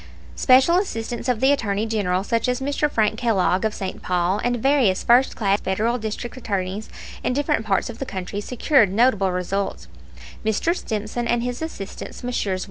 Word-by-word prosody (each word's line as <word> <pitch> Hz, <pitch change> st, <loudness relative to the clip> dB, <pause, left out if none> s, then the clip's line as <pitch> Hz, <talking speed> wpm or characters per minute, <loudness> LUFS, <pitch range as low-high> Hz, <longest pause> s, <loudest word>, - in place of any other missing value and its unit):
Special 265 Hz, +7 st, +5 dB
assistants 240 Hz, -, -2 dB
of 245 Hz, -3 st, 0 dB
the 265 Hz, +1 st, +5 dB
Attorney 215 Hz, -6 st, 0 dB
General, 195 Hz, -4 st, 0 dB
such 230 Hz, +2 st, 0 dB
as 250 Hz, 0 st, 0 dB
Mr. 285 Hz, +2 st, 0 dB
Frank 220 Hz, -4 st, +1 dB
Kellogg, 195 Hz, -5 st, +2 dB
of 220 Hz, -1 st, 0 dB
St. 190 Hz, -, -5 dB
Paul, 180 Hz, +2 st, 0 dB
and 245 Hz, 0 st, +1 dB
various 245 Hz, -6 st, +2 dB
first 245 Hz, +3 st, +4 dB
class 200 Hz, -2 st, +1 dB
Federal 220 Hz, +6 st, 0 dB
district 220 Hz, +2 st, -5 dB
attorneys 200 Hz, -3 st, -3 dB, 0.3 s
in -, -, 0 dB
different 285 Hz, -5 st, 0 dB
parts 195 Hz, -2 st, +1 dB
of 235 Hz, -1 st, -8 dB
the 270 Hz, -, -3 dB
country 195 Hz, +1 st, -4 dB
secured 245 Hz, -, +2 dB
notable 205 Hz, -3 st, +3 dB
results: 185 Hz, +2 st, -3 dB, 0.6 s
Mr. 220 Hz, -, +1 dB
Stimson 220 Hz, -, -3 dB
and 235 Hz, 0 st, +1 dB
his 245 Hz, +2 st, -4 dB
assistants, 265 Hz, -7 st, -7 dB
Messrs. 205 Hz, -6 st, -1 dB
225 Hz, 170 wpm, -22 LUFS, 200-250 Hz, 0.6 s, Special